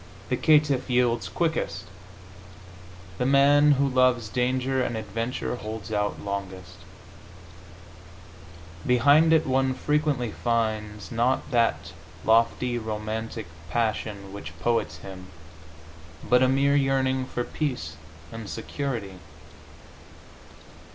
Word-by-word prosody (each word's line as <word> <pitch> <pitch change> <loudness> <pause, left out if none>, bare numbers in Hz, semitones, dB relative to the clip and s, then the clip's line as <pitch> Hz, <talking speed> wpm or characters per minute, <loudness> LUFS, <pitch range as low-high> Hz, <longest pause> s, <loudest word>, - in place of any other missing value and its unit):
The 125 - +2
caitiff 145 -2 +3
yields 120 -6 +1
quickest; 165 - -2 1.3
the 125 - +1
man 145 +2 +5
who 140 0 +2
loves 130 -4 +2
danger 130 +2 0
and 120 -2 -2
adventure 115 +4 -3
holds 110 -1 -7
out 105 -1 -1
longest. 95 -3 -6 2.1
Behind 145 +6 +5
it 160 - +4
one 130 0 +1
frequently 145 -5 0
finds, 110 -5 -2
not 120 +5 0
that 115 -2 +1 0.3
lofty 115 +2 +2
romantic 110 0 -4 0.2
passion 105 -3 -2
which 80 -6 -8
poets 115 -10 0
hymn, 90 +2 -10 1.0
but 125 +1 +4
a 130 - +5
mere 140 +2 +3
yearning 135 -1 +1
for 125 -1 -3
peace 120 - -3 0.4
and 115 -3 -7
security. 115 -6 -4
120 Hz, 100 wpm, -26 LUFS, 105-130 Hz, 2.1 s, man